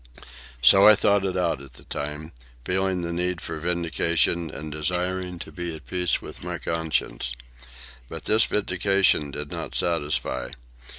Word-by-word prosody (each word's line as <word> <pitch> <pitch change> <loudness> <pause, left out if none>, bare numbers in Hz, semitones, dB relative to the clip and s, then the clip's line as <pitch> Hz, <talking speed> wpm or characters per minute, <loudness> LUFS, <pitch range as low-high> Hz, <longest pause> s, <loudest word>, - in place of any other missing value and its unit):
So 95 +8 +8
I 110 - +10
thought 100 -1 +3
it 95 -1 -1
out 85 -6 0
at 70 -3 -13
the - - -15
time, 75 +2 -5 0.3
feeling 95 -1 0
the 85 0 -3
need 90 0 -1
for 80 -1 -4
vindication 85 0 +1
and 75 +1 -6
desiring 90 +3 -2
to - - -9
be 85 -2 -5
at 80 - -12
peace 90 -2 -1
with - - -10
my - - -3
conscience. 80 -6 -2 0.8
But - - -7
this 110 +1 +4
vindication 95 -5 +2
did 75 +1 -6
not - - -5
satisfy. 75 -6 -1
85 Hz, 155 wpm, -25 LUFS, 75-90 Hz, 0.8 s, I